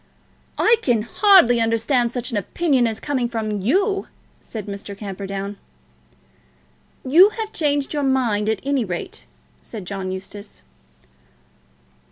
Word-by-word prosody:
"I 460 Hz, +1 st, +4 dB
can 235 Hz, -, +1 dB
hardly 245 Hz, -, +5 dB
understand 230 Hz, +2 st, +1 dB
such 245 Hz, +1 st, -4 dB
an 225 Hz, -, -1 dB
opinion 265 Hz, -, +1 dB
as 220 Hz, -1 st, -3 dB
coming 260 Hz, -5 st, -1 dB
from 215 Hz, -3 st, -2 dB
you," 390 Hz, -, +1 dB, 0.3 s
said 215 Hz, -4 st, -8 dB
Mr. 200 Hz, 0 st, -7 dB
Camperdown. 200 Hz, 0 st, -5 dB, 1.5 s
"You 350 Hz, +9 st, +7 dB
have 440 Hz, -1 st, -4 dB
changed 290 Hz, -2 st, 0 dB
your 295 Hz, -, -1 dB
mind, 245 Hz, -6 st, +1 dB
at 220 Hz, -3 st, -1 dB
any 275 Hz, -2 st, 0 dB
rate," 180 Hz, -4 st, -6 dB, 0.3 s
said 215 Hz, -5 st, -9 dB
John 190 Hz, 0 st, -4 dB
Eustace. 195 Hz, -, -8 dB
230 Hz, 125 wpm, -21 LUFS, 205-280 Hz, 1.5 s, You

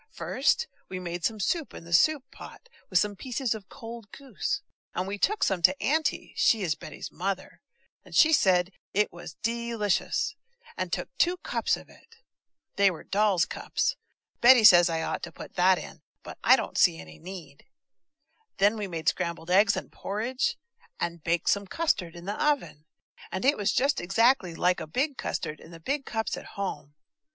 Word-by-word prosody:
First, 475 Hz, -, +1 dB, 0.2 s
we 185 Hz, -, -5 dB
made 175 Hz, -1 st, -5 dB
soup 225 Hz, -, -1 dB
in -, -, -9 dB
the 170 Hz, 0 st, -7 dB
soup 295 Hz, -, +4 dB
pot, -, -, -12 dB, 0.2 s
with 185 Hz, -, +2 dB
some 205 Hz, +2 st, +1 dB
pieces 250 Hz, +3 st, -2 dB
of 210 Hz, -4 st, -10 dB
cold 230 Hz, -2 st, -10 dB
goose, 275 Hz, -2 st, -4 dB, 0.3 s
and 185 Hz, -, -2 dB
we 200 Hz, +1 st, -4 dB
took 420 Hz, -, +1 dB
some 190 Hz, -2 st, +1 dB
to 275 Hz, +11 st, +4 dB
Auntie 310 Hz, 0 st, 0 dB
(she 220 Hz, -3 st, +3 dB
is 165 Hz, -4 st, +1 dB
Betty's 150 Hz, -, -9 dB
mother), 190 Hz, +2 st, -4 dB, 0.4 s
and -, -, -11 dB
she 320 Hz, 0 st, +6 dB
said 185 Hz, -, +3 dB, 0.2 s
it 210 Hz, +1 st, +2 dB
was 170 Hz, -4 st, -10 dB
de 235 Hz, +1 st, -2 dB
licious, 205 Hz, -4 st, 0 dB, 0.4 s
and -, -, -3 dB
took -, -, -4 dB
two 355 Hz, +1 st, +3 dB
cups -, -, 0 dB
of -, -, -13 dB
it. 460 Hz, -, -20 dB, 0.6 s
(They 200 Hz, 0 st, +6 dB
were 170 Hz, -4 st, -7 dB
doll's 200 Hz, -3 st, +2 dB
cups; -, -, -2 dB, 0.5 s
Betty 245 Hz, -1 st, +8 dB
says 175 Hz, -4 st, +8 dB
I 165 Hz, -1 st, -1 dB
ought -, -, -3 dB
to 170 Hz, -, -6 dB
put -, -, -11 dB
that 185 Hz, +1 st, +4 dB
in, -, -, -9 dB, 0.2 s
but -, -, -10 dB
I -, -, +8 dB
don't -, -, -3 dB
see 80 Hz, -, +5 dB
any 80 Hz, -1 st, -12 dB
need.) 170 Hz, -, -10 dB, 0.9 s
Then 205 Hz, +3 st, +3 dB
we 210 Hz, -2 st, -3 dB
made 165 Hz, -3 st, -6 dB
scrambled 170 Hz, -1 st, -1 dB
egg 200 Hz, +2 st, +5 dB
and -, -, -6 dB
porridge, 230 Hz, +6 st, -2 dB, 0.4 s
and 170 Hz, -2 st, -3 dB
baked 170 Hz, 0 st, +1 dB
some 200 Hz, -1 st, 0 dB
custard 185 Hz, -, -1 dB
in 170 Hz, 0 st, -10 dB
the 205 Hz, +7 st, -2 dB
oven, 285 Hz, -, 0 dB, 0.5 s
and 190 Hz, -, -3 dB
it 280 Hz, -, +5 dB
was 205 Hz, -2 st, 0 dB
just 275 Hz, +1 st, +1 dB
exactly 195 Hz, -1 st, +2 dB
like 180 Hz, +1 st, +2 dB
a -, -, -6 dB
big 270 Hz, -, -1 dB
custard 155 Hz, -, -4 dB
in -, -, -14 dB
the 165 Hz, -1 st, -11 dB
big 275 Hz, -, -2 dB
cups 220 Hz, -1 st, -2 dB
at -, -, -9 dB
home. 185 Hz, -7 st, -5 dB
200 Hz, 185 wpm, -27 LUFS, 175-235 Hz, 0.9 s, Betty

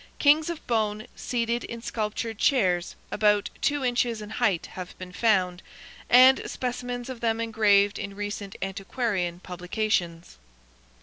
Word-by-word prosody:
Kings 305 Hz, +3 st, +4 dB
of 340 Hz, -2 st, -6 dB
bone, 215 Hz, -2 st, 0 dB
seated 235 Hz, -1 st, -1 dB
in 230 Hz, 0 st, -7 dB
sculptured 220 Hz, 0 st, -3 dB
chairs, 185 Hz, -10 st, +2 dB, 0.2 s
about 210 Hz, -1 st, +2 dB
two 290 Hz, -2 st, +1 dB
inches 240 Hz, -2 st, +1 dB
in 210 Hz, 0 st, -8 dB
height, 215 Hz, -7 st, +1 dB
have 180 Hz, -1 st, -8 dB
been 185 Hz, -1 st, -9 dB
found, 185 Hz, -4 st, +1 dB, 0.5 s
and 255 Hz, +2 st, +7 dB
specimens 245 Hz, -1 st, -4 dB
of 260 Hz, -3 st, -6 dB
them 225 Hz, -1 st, +1 dB
engraved 210 Hz, -3 st, +3 dB
in 200 Hz, -1 st, -6 dB
recent 205 Hz, -1 st, -5 dB
antiquarian 195 Hz, -2 st, -2 dB
publications. 180 Hz, -, -2 dB
215 Hz, 130 wpm, -26 LUFS, 195-240 Hz, 0.5 s, and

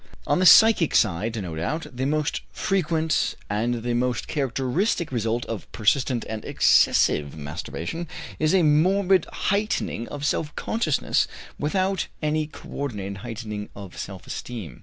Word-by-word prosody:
On -, -, +2 dB
the 185 Hz, -, +5 dB
psychic 220 Hz, -2 st, +7 dB
side, 110 Hz, +6 st, +2 dB
no 90 Hz, -5 st, -5 dB
doubt, 150 Hz, -, -2 dB
the 130 Hz, +2 st, -1 dB
most 150 Hz, 0 st, 0 dB
frequent 160 Hz, -4 st, 0 dB, 0.2 s
and 115 Hz, +3 st, -1 dB
the 120 Hz, 0 st, -1 dB
most 125 Hz, +1 st, 0 dB
characteristic 140 Hz, -, 0 dB
result 115 Hz, 0 st, -1 dB
of 115 Hz, -3 st, -6 dB
persistent 120 Hz, +2 st, +1 dB
and 110 Hz, -1 st, -5 dB
excessive 70 Hz, -1 st, +3 dB
masturbation 80 Hz, -, -5 dB, 0.3 s
is 155 Hz, +4 st, +3 dB
a 185 Hz, -, +4 dB
morbid 180 Hz, +4 st, +3 dB
heightening 200 Hz, -, -1 dB
of 145 Hz, 0 st, -5 dB
self 150 Hz, +1 st, -1 dB
consciousness 170 Hz, -, 0 dB, 0.3 s
without 185 Hz, +5 st, 0 dB
any 155 Hz, 0 st, 0 dB
co -, -, -13 dB
ordinated 100 Hz, -8 st, -4 dB
heightening 105 Hz, -1 st, -6 dB
of 100 Hz, -3 st, -9 dB
self 95 Hz, -2 st, -7 dB
esteem. 105 Hz, -, -7 dB
130 Hz, 140 wpm, -24 LUFS, 110-160 Hz, 0.3 s, psychic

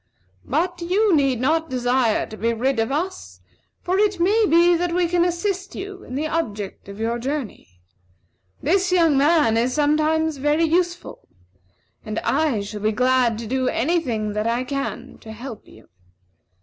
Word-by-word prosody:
But 345 Hz, +5 st, -1 dB
you 380 Hz, +2 st, +2 dB
need 270 Hz, -5 st, +2 dB
not 320 Hz, +5 st, +1 dB
desire 245 Hz, -2 st, +1 dB
to 215 Hz, -, -10 dB
be 230 Hz, +2 st, -1 dB
rid 255 Hz, +2 st, 0 dB
of 225 Hz, +3 st, 0 dB
us, 360 Hz, +6 st, -4 dB, 0.4 s
for 370 Hz, +2 st, 0 dB
it 410 Hz, -3 st, +1 dB
may 415 Hz, +5 st, +3 dB
be 345 Hz, +2 st, +5 dB
that 345 Hz, 0 st, -1 dB
we 355 Hz, -1 st, +2 dB
can 345 Hz, 0 st, +2 dB
assist 370 Hz, +2 st, -2 dB
you 390 Hz, 0 st, -7 dB
in 255 Hz, -, -8 dB
the 295 Hz, +3 st, -1 dB
object 210 Hz, -13 st, -4 dB
of 200 Hz, +1 st, -9 dB
your 230 Hz, +2 st, -1 dB
journey. 245 Hz, -, -5 dB, 0.8 s
This 370 Hz, +4 st, +2 dB
young 335 Hz, -5 st, +4 dB
man 285 Hz, -5 st, +3 dB
is 245 Hz, +2 st, 0 dB
sometimes 310 Hz, +1 st, +1 dB
very 295 Hz, +4 st, +1 dB
useful, 350 Hz, +2 st, -2 dB, 0.8 s
and 215 Hz, -1 st, -5 dB
I 285 Hz, -7 st, +1 dB
shall 205 Hz, +1 st, -7 dB
be 215 Hz, +1 st, +1 dB
glad 250 Hz, 0 st, +2 dB
to 230 Hz, -, -6 dB
do 260 Hz, +3 st, -1 dB
any 335 Hz, +8 st, +1 dB
thing 220 Hz, -8 st, -3 dB
that 210 Hz, +1 st, -1 dB
I 235 Hz, +2 st, 0 dB
can 275 Hz, +1 st, -5 dB
to 220 Hz, -, -11 dB
help 230 Hz, 0 st, -9 dB
you. 110 Hz, -, -17 dB
290 Hz, 170 wpm, -22 LUFS, 235-345 Hz, 0.8 s, be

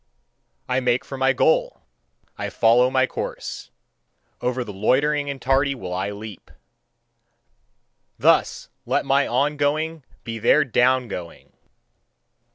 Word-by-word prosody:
I 125 Hz, 0 st, +1 dB
make 125 Hz, +1 st, 0 dB
for 135 Hz, -, -7 dB
my 135 Hz, 0 st, +2 dB
goal, -, -, +1 dB, 0.5 s
I -, -, -4 dB
follow 120 Hz, +2 st, +4 dB
my 130 Hz, 0 st, +2 dB
course; -, -, -6 dB, 0.7 s
over 125 Hz, 0 st, -1 dB
the 105 Hz, -3 st, -9 dB
loitering 145 Hz, +8 st, +1 dB
and 140 Hz, -1 st, -5 dB
tardy 135 Hz, +2 st, +1 dB
will 90 Hz, -8 st, -6 dB
I 95 Hz, +2 st, -2 dB
leap. 105 Hz, -1 st, -9 dB, 1.7 s
Thus -, -, +2 dB, 0.2 s
let -, -, 0 dB
my 140 Hz, +1 st, +2 dB
on 145 Hz, +4 st, 0 dB
going 155 Hz, +2 st, -1 dB, 0.2 s
be 115 Hz, -1 st, -6 dB
their 150 Hz, +7 st, +4 dB
down 125 Hz, 0 st, +2 dB
going! 90 Hz, -5 st, -9 dB
130 Hz, 125 wpm, -22 LUFS, 115-145 Hz, 1.7 s, follow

